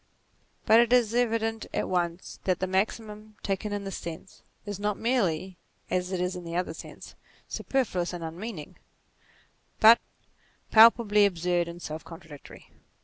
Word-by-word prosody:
But 225 - +6
it 235 0 +3
is 240 -3 +4
evident 225 -2 0
at - - -1
once 175 -1 -2
that 185 -2 +1
the 185 - 0
maxim, 210 +2 -3
taken 200 +1 -2
in 205 0 -3
this 195 -1 -5
sense, 170 +2 -9 0.2
is 205 -2 -5
not 210 0 -1
merely, 190 -7 0 0.3
as 180 0 -1
it 185 - -2
is 180 +1 -1
in 180 - -7
the 170 0 -6
other 180 -2 -1
sense, - - -11 0.3
superfluous 195 -10 -1
and 175 -2 -6
unmeaning, 165 0 -7 1.0
but 225 +2 +8 0.7
palpably 220 -2 +6
absurd 175 -1 -1
and 170 0 -8
self 155 +1 -6
contradictory. 160 -4 -13
190 Hz, 145 wpm, -27 LUFS, 175-220 Hz, 1.0 s, but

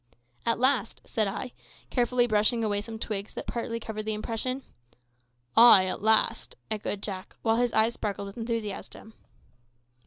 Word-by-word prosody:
"At 230 - +2
last!" 255 -3 +1
said 215 -2 0
I, 240 +6 -4 0.4
carefully 245 -1 +2
brushing 220 +1 +2
away 205 -2 0
some 225 +1 -8
twigs 210 -2 -5
that - - -5
partly 230 -1 -3
covered 220 -1 -5
the 220 -1 -1
impression. 245 +5 -3 0.9
"Ay, 225 -5 +9
at 185 - -4
last!" 220 +1 +2 0.2
echoed 205 -1 -3
Jack, 190 -2 -5
while 225 0 +2
his 245 0 +1
eyes 220 +2 +3
sparkled 200 -3 -4
with 200 +1 -9
enthusiasm. 225 -1 -5
220 Hz, 150 wpm, -28 LUFS, 210-235 Hz, 0.9 s, Ay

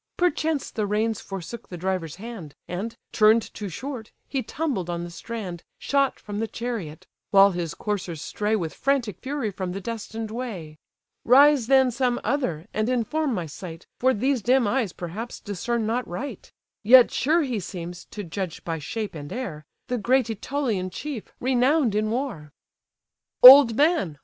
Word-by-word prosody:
Perchance 320 -4 0
the 215 -2 -2
reins 215 +1 0
forsook 195 +4 -8
the 175 - -7
driver's 180 -3 -2
hand, 195 -7 -9
And, 200 +6 -4 0.2
turn'd 220 +1 +4
too 205 -2 -5
short, 245 - -7 0.2
he 270 - -2
tumbled 255 - -3
on 170 0 -3
the 175 - -7
strand, 185 -3 -6
Shot 275 0 0
from 205 0 -6
the 225 - -1
chariot; 205 -9 -5 0.2
while 200 0 +6
his 175 -3 -4
coursers 185 -6 -3
stray 210 +7 -1
With 165 -7 -3
frantic 270 -7 -1
fury 265 -5 -3
from 185 -2 -4
the 195 - -4
destined 225 +1 -5
way. 190 -11 -6 0.4
Rise 275 0 +6
then 265 -1 +5
some 245 0 0
other, 175 - -1
and 215 +2 0
inform 255 +3 0
my 175 -3 -3
sight, 165 +2 -9
For 260 +1 +4
these 260 +2 0
dim 250 +2 +3
eyes, 230 -3 0
perhaps, 195 +9 -6
discern 220 +3 -2
not 235 +3 -1
right; 250 +11 -6 0.3
Yet 245 +3 +7
sure 320 +5 +2
he 250 -6 -2
seems, 175 -1 -7
to 205 - -7
judge 180 -1 -5
by 165 -1 -3
shape 215 +8 -4
and 145 -3 -8
air, 165 - -5 0.2
The 250 -1 -1
great 255 +4 +3
Ætolian 225 -4 -2
chief, 285 -3 -6
renown'd 255 0 +2
in 215 +1 0
war." 225 - -3 0.9
"Old 255 -2 +11
man! 290 - +2
220 Hz, 165 wpm, -25 LUFS, 185-255 Hz, 0.9 s, Old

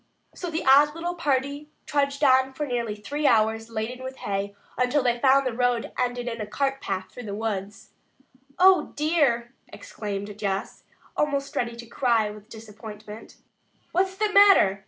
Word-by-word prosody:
So 355 - -5
the 325 0 -3
odd 290 +3 +6
little 345 +1 -3
party 285 -2 -1 0.2
trudged 280 0 0
on 265 -1 +4
for 295 +3 -3
nearly 235 -5 -2
three 285 +8 -2
hours, 225 0 +2
laden 230 +3 -4
with 260 0 -6
hay, 200 0 -3 0.2
until 250 +3 +1
they 240 -1 +1
found 275 +1 +4
that 255 - 0
the - - -9
road 245 -1 0
ended 245 -1 -2
in 230 -2 -4
a 210 - -4
cart 270 +4 -1
path 190 -1 -4
through 245 - -9
the 200 - -4
woods. 205 -2 -5 0.7
"Oh, 375 0 +5
dear!" 285 -6 +1
exclaimed 205 - -6
Jess, 195 -2 -3 0.3
almost 280 -2 -1
ready 235 -1 -1
to 235 0 -9
cry 230 -3 +1
with 210 +1 -13
disappointment. 215 -1 -11 0.6
"What's 375 +1 +1
the 425 +1 -1
matter?" 390 - +6
245 Hz, 165 wpm, -25 LUFS, 220-285 Hz, 0.7 s, odd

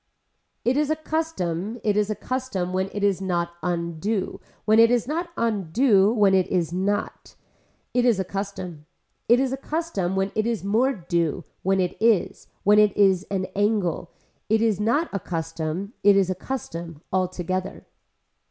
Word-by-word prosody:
It 250 +3 +2
is 300 0 +1
a 310 - +2
custom, 240 - -3
it 210 -2 +2
is 210 0 +1
a 215 - -1
custom 210 -6 -3
when 190 +1 0
it 205 - -4
is 195 -2 +2
not 175 -2 -1
undue, 175 +3 -2 0.2
when 215 +1 +5
it 230 0 +7
is 240 -1 +1
not 335 +4 -2
undue, 210 0 +3
when 205 -4 +4
it 190 -1 +3
is 175 -3 -1
not. 195 +3 -2 0.6
It 245 - +2
is 235 -5 +3
a - - +1
custom. 180 -5 -6 0.4
It 240 +1 +6
is 265 -1 0
a - - -2
custom 275 - -2
when 195 +1 0
it 215 +1 0
is 230 -4 -2
more 225 +7 +2
due, 170 - -1 0.2
when 195 +1 +1
it 180 -1 0
is, 225 -4 +2 0.2
when 210 +1 +6
it 210 -2 +4
is 195 -2 +3
an 190 -2 -1
angle, 200 -5 0 0.4
it 220 +1 +3
is 215 -4 +2
not 235 +10 +1
a 200 - -1
custom, 165 +3 -4
it 200 0 +6
is 190 -2 +2
a - - +1 0.2
custom 165 - -5
altogether. 185 0 -2
200 Hz, 170 wpm, -24 LUFS, 180-230 Hz, 0.6 s, it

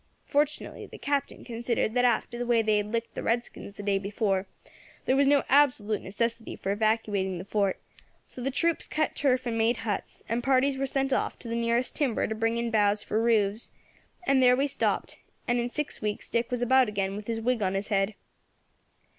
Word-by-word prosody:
Fortunately 295 +1 -1
the - - -11
Captain 280 -1 -2
considered 235 -2 -1
that 250 0 +3
after 240 0 +1
the 245 - -1
way 235 -2 +3
they 215 -1 +3
had 210 0 -2
licked 230 0 -2
the - - -5
redskins 230 -3 -3
the 205 - -6
day 200 -1 +1
before 200 -1 -1 0.6
there 260 - +3
was 280 0 +4
no 285 0 +4
absolute 250 -7 +3
necessity 230 +3 -3
for 195 - -3
evacuating 205 -3 0
the 180 - -7
Fort; 200 -2 0 0.5
so 250 - -10
the 265 - -1
troops 335 +5 0
cut 310 0 -1
turf 255 -2 +1
and 230 -2 -1
made 230 +2 +2
huts, 205 -3 -4
and 230 +2 -1
parties 270 +1 +3
were 270 +1 -1
sent 270 0 0
off - - -1
to - - -10
the 230 - -3
nearest 235 +1 0
timber 270 -7 +1
to - - -2
bring 225 +1 0
in 235 0 -1
boughs 210 -1 +2
for 220 - 0
roofs, 220 -2 +1 0.6
and 275 -5 +4
there 250 -1 +6
we 275 - +2
stopped, 280 - -1 0.3
and 240 0 +2
in 240 +1 -1
six 300 +3 -4
weeks 210 -1 -3
Dick 235 0 0
was 245 -1 -1
about 260 -1 +4
again 195 -1 -2
with 210 0 -7
his 230 -1 -2
wig 240 0 0
on 190 -1 0
his 195 +1 -3
head. 200 0 +1
230 Hz, 205 wpm, -28 LUFS, 210-255 Hz, 0.6 s, there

